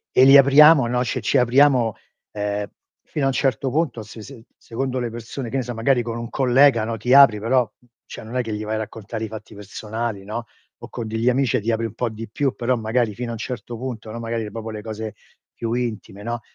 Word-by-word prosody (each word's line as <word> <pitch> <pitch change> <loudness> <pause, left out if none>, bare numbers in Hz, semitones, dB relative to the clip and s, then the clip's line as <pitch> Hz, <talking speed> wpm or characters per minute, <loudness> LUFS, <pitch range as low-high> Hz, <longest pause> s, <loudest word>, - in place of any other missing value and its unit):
E 130 - +7
li 135 +1 +8
apriamo, 140 0 +7
no 125 +1 0
cioè - - -2
ci - - +1
apriamo, 125 -2 +4 0.4
uhm, 105 0 -2 0.4
fino 150 - -4
a - - +3
un - - -1
certo 135 0 0
punto 140 -6 -1
se 110 +1 -11
se 115 0 -12
secondo 130 +2 -4
le 120 -2 -2
persone 120 +2 -7
che 135 - -6
ne 130 - 0
so 120 - -5
magari 120 +2 +2
con 115 0 -4
un 115 -1 -6
collega, 130 -2 +4
no, 115 +1 -3
ti 125 +4 +1
apri 135 -6 +7
però 120 +1 +1 0.4
cioè - - -9
non 115 +3 -9
è 125 - +2
che 115 -3 -5
gli 105 0 -4
vai 110 +1 -2
a - - -2
raccontare 110 +1 -6
i - - -2
fatti 110 0 -10
personali, 105 +1 -5
no, 115 +3 -5 0.3
o - - -10
con 115 - -5
degli 115 +2 0
amici 130 0 +1
e 125 - +1
ti 115 - -1
apri 115 0 -1
un 110 - -5
po' 120 +1 -2
di 110 +1 -8
più 135 +4 -1
però 125 +2 0
magari 115 0 0
fino 120 +2 -5
a - - -3
un - - -5
certo 120 0 -6
punto, 115 -3 -6
no, 115 - -6
magari 115 -2 -4
proprio 115 +1 -6
le 110 -1 -6
cose 110 -1 -6 0.4
più 115 -1 -4
intime, 115 -4 -4
no, 120 +1 -4
115 Hz, 245 wpm, -22 LUFS, 110-125 Hz, 0.4 s, li